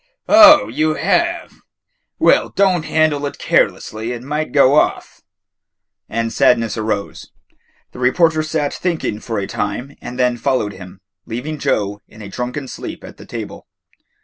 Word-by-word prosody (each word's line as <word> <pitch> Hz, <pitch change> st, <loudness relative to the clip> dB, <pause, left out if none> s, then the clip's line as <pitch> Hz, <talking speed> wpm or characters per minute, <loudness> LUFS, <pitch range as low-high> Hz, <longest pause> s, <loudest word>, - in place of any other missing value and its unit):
"Oh, 310 Hz, -1 st, +8 dB
you 155 Hz, 0 st, 0 dB
have? 340 Hz, -, 0 dB, 0.6 s
Well, -, -, +3 dB
don't 185 Hz, -5 st, +1 dB
handle 155 Hz, -2 st, +1 dB
it -, -, -8 dB
carelessly; 110 Hz, +3 st, 0 dB
it 120 Hz, 0 st, -8 dB
might 150 Hz, +3 st, -3 dB
go 140 Hz, -1 st, +4 dB
off." 150 Hz, -, 0 dB, 0.9 s
And 115 Hz, 0 st, -2 dB
Sadness 115 Hz, -3 st, +2 dB
rose. 110 Hz, -2 st, -4 dB, 0.6 s
The -, -, -12 dB
reporter 160 Hz, +5 st, +2 dB
sat 155 Hz, -2 st, -2 dB
thinking 165 Hz, -, -2 dB
for 115 Hz, 0 st, -5 dB
a 100 Hz, -, -2 dB
time 115 Hz, +9 st, -4 dB
and 125 Hz, +1 st, -8 dB
then 125 Hz, -1 st, +1 dB
followed 120 Hz, -5 st, -1 dB
him, 95 Hz, +1 st, -12 dB, 0.3 s
leaving 140 Hz, +7 st, -5 dB
Joe 100 Hz, -3 st, -1 dB
in 110 Hz, -, -13 dB
a 100 Hz, -, -8 dB
drunken 125 Hz, +5 st, -5 dB
sleep -, -, -8 dB
at -, -, -12 dB
the -, -, -14 dB
table. -, -, -8 dB
130 Hz, 150 wpm, -18 LUFS, 110-155 Hz, 0.9 s, Oh